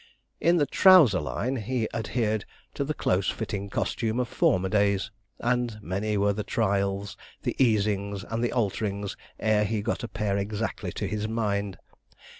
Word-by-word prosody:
In 175 Hz, +1 st, +4 dB
the 145 Hz, -, +3 dB
trouser 160 Hz, -, +6 dB
line 125 Hz, -, -2 dB
he 115 Hz, 0 st, -1 dB
adhered 110 Hz, -2 st, -1 dB, 0.3 s
to -, -, -1 dB
the 150 Hz, +2 st, -3 dB
close 95 Hz, +2 st, +1 dB
fitting 100 Hz, -1 st, -4 dB
costume 115 Hz, +3 st, -1 dB
of 125 Hz, -, 0 dB
former 95 Hz, -3 st, +2 dB
days; 100 Hz, 0 st, +1 dB, 0.3 s
and 120 Hz, -2 st, 0 dB
many 105 Hz, +2 st, -2 dB
were 100 Hz, 0 st, +2 dB
the 105 Hz, +1 st, -3 dB
trials, 100 Hz, -2 st, -1 dB, 0.3 s
the -, -, -1 dB
easings, 100 Hz, -3 st, +1 dB
and 115 Hz, +2 st, -3 dB
the 120 Hz, -, +1 dB
alterings, 100 Hz, -3 st, -1 dB, 0.2 s
ere 110 Hz, -1 st, +3 dB
he 105 Hz, 0 st, -1 dB
got 120 Hz, -, -2 dB
a -, -, -2 dB
pair 100 Hz, -3 st, -1 dB
exactly 105 Hz, +2 st, -3 dB
to -, -, -3 dB
his 105 Hz, 0 st, -2 dB
mind. 105 Hz, -3 st, -1 dB
105 Hz, 160 wpm, -27 LUFS, 100-115 Hz, 0.3 s, trouser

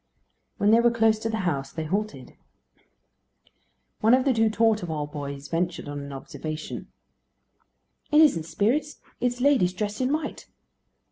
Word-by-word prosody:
When 205 Hz, +1 st, +3 dB
they 225 Hz, -, +6 dB
were 240 Hz, 0 st, +5 dB
close 225 Hz, -2 st, +2 dB
to 225 Hz, -, -3 dB
the 220 Hz, -2 st, -2 dB
house 140 Hz, -5 st, -1 dB
they 160 Hz, -, -4 dB
halted. 175 Hz, -6 st, -3 dB, 1.6 s
One 225 Hz, +3 st, +5 dB
of 260 Hz, +1 st, 0 dB
the 270 Hz, -, +3 dB
two 225 Hz, -1 st, +3 dB
Torteval 185 Hz, -10 st, 0 dB
boys 140 Hz, -1 st, -6 dB
ventured 170 Hz, -1 st, -2 dB
on 145 Hz, 0 st, -5 dB
an 140 Hz, 0 st, -7 dB
observation: 155 Hz, +3 st, -6 dB, 1.2 s
"It 300 Hz, -, +6 dB
isn't 260 Hz, -, +5 dB
spirits: 250 Hz, -, 0 dB, 0.2 s
it 250 Hz, -, +2 dB
is 245 Hz, -, -10 dB
ladies 255 Hz, -11 st, +3 dB
dressed 205 Hz, +4 st, -3 dB
in 255 Hz, +1 st, +1 dB
white." 305 Hz, 0 st, -3 dB
210 Hz, 150 wpm, -26 LUFS, 155-235 Hz, 1.6 s, they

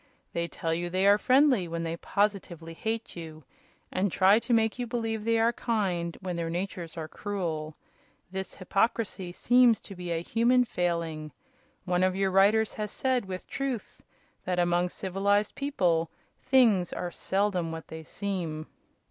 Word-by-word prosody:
They 170 Hz, 0 st, -1 dB
tell 165 Hz, -1 st, -3 dB
you 175 Hz, +1 st, -2 dB
they 185 Hz, +2 st, +1 dB
are 200 Hz, +1 st, +6 dB
friendly 255 Hz, -7 st, +4 dB
when 165 Hz, 0 st, -3 dB
they 165 Hz, 0 st, -2 dB
positively 180 Hz, -4 st, -1 dB
hate 225 Hz, +6 st, -4 dB
you, 160 Hz, -2 st, -9 dB, 0.5 s
and 185 Hz, 0 st, 0 dB
try 195 Hz, +5 st, +5 dB
to 245 Hz, -, -6 dB
make 225 Hz, 0 st, +2 dB
you 245 Hz, -, -2 dB
believe 225 Hz, -2 st, -2 dB
they 230 Hz, +1 st, +2 dB
are 230 Hz, +1 st, +3 dB
kind 185 Hz, -9 st, -1 dB
when 185 Hz, -2 st, -3 dB
their 165 Hz, -1 st, -2 dB
natures 175 Hz, -1 st, -4 dB
are 160 Hz, -1 st, -4 dB
cruel. 160 Hz, -6 st, -4 dB, 0.5 s
This 190 Hz, 0 st, -5 dB
hypocrisy 195 Hz, -1 st, -1 dB
seems 245 Hz, +3 st, +4 dB
to 200 Hz, -, -10 dB
be 180 Hz, -1 st, -6 dB
a 165 Hz, 0 st, -1 dB
human 245 Hz, +5 st, +3 dB
failing. 170 Hz, -6 st, -2 dB, 0.5 s
One 180 Hz, -1 st, +1 dB
of 185 Hz, 0 st, +2 dB
your 195 Hz, 0 st, +1 dB
writers 205 Hz, +3 st, +4 dB
has 210 Hz, -1 st, -4 dB
said, 255 Hz, 0 st, 0 dB
with 185 Hz, -1 st, -6 dB
truth, 270 Hz, -5 st, -4 dB, 0.4 s
that 180 Hz, -1 st, -1 dB
among 175 Hz, 0 st, +2 dB
civilized 200 Hz, +3 st, 0 dB
people 175 Hz, -, +1 dB, 0.3 s
things 220 Hz, -9 st, +4 dB
are 175 Hz, -1 st, -4 dB
seldom 190 Hz, -4 st, 0 dB
what 160 Hz, 0 st, -7 dB
they 160 Hz, 0 st, -7 dB
seem." 170 Hz, -5 st, -4 dB
190 Hz, 160 wpm, -28 LUFS, 170-220 Hz, 0.5 s, are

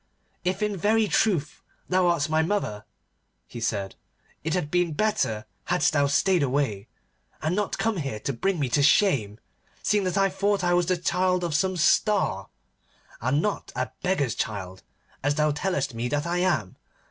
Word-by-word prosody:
'If 185 Hz, +3 st, -1 dB
in 210 Hz, -1 st, 0 dB
very 215 Hz, +4 st, +2 dB
truth 175 Hz, -9 st, +1 dB, 0.3 s
thou 185 Hz, -1 st, +2 dB
art 170 Hz, -4 st, +2 dB
my 155 Hz, 0 st, +2 dB
mother,' 160 Hz, -, -2 dB, 0.6 s
he 120 Hz, -, -9 dB
said, 100 Hz, -4 st, -2 dB, 0.5 s
'it 160 Hz, +2 st, -1 dB
had 155 Hz, -5 st, -2 dB
been 175 Hz, -2 st, +1 dB
better 195 Hz, -, 0 dB, 0.2 s
hadst 180 Hz, -1 st, +2 dB
thou 145 Hz, -1 st, +3 dB
stayed 175 Hz, +5 st, +2 dB
away, 130 Hz, -7 st, -1 dB, 0.5 s
and 160 Hz, +3 st, -1 dB
not 205 Hz, -1 st, -1 dB
come 225 Hz, -3 st, 0 dB
here 135 Hz, -9 st, -3 dB
to 140 Hz, -, -2 dB
bring 185 Hz, +8 st, -1 dB
me 140 Hz, -, +1 dB
to 145 Hz, -, +2 dB
shame, 135 Hz, -, +3 dB, 0.4 s
seeing 210 Hz, -1 st, +2 dB
that 185 Hz, +1 st, -1 dB
I 195 Hz, 0 st, +4 dB
thought 195 Hz, +1 st, 0 dB
I 175 Hz, 0 st, +2 dB
was 175 Hz, -1 st, +2 dB
the 185 Hz, -1 st, +2 dB
child 180 Hz, +1 st, +1 dB
of 170 Hz, -2 st, -2 dB
some 185 Hz, +4 st, +1 dB
Star, 175 Hz, -, +2 dB, 0.7 s
and 130 Hz, +6 st, +1 dB
not 210 Hz, -, -2 dB
a 125 Hz, -2 st, -2 dB
beggar's 180 Hz, -11 st, 0 dB
child, 95 Hz, -5 st, -4 dB, 0.4 s
as 145 Hz, +1 st, +1 dB
thou 150 Hz, 0 st, +2 dB
tellest 145 Hz, -3 st, -1 dB
me 115 Hz, +2 st, -2 dB
that 145 Hz, +4 st, -1 dB
I 175 Hz, +1 st, -1 dB
am. 155 Hz, -, 0 dB
165 Hz, 175 wpm, -26 LUFS, 135-185 Hz, 0.7 s, I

